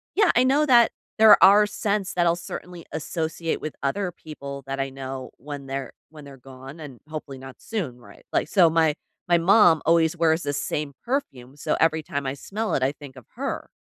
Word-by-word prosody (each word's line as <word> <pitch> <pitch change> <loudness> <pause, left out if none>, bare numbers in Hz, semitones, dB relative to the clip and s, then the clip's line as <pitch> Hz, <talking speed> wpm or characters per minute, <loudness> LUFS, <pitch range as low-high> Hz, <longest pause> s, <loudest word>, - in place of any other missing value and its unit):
yeah, 410 -2 +4
I 245 - +5
know 285 +4 +3
that 240 -4 +5 0.3
there 220 -1 +8
are 205 +2 +7
scents 205 -2 -2
that 175 -1 +1
I'll 170 0 +3
certainly 175 0 -8
associate 160 +1 -3
with 155 - -5
other 180 +6 -1
people 140 -4 -9
that 135 0 -4
I 135 0 -1
know 135 -1 -7
when 145 0 -8
they're 135 -1 -4 0.2
when 150 -2 -13
they're 140 -1 -12
gone 135 +3 -12
and 145 -6 -10
hopefully 150 -3 -7
not 130 0 -11
soon, 160 - -5
right? 120 - -17
Like, - - 0
so 180 -5 +5
my 160 -2 +2 0.3
my 175 -1 +4
mom 175 -3 +5
always 165 0 +3
wears 165 0 +2
the 145 - -2
same 145 +1 -3
perfume, 140 - -4
so - - -1
every 160 0 +2
time 140 -1 -4
I 130 - -2
smell 210 +10 -4
it, 130 - 0
I 135 - +2
think 145 -2 -12
of 130 -4 -13
her. - - -4
160 Hz, 205 wpm, -24 LUFS, 135-180 Hz, 0.3 s, there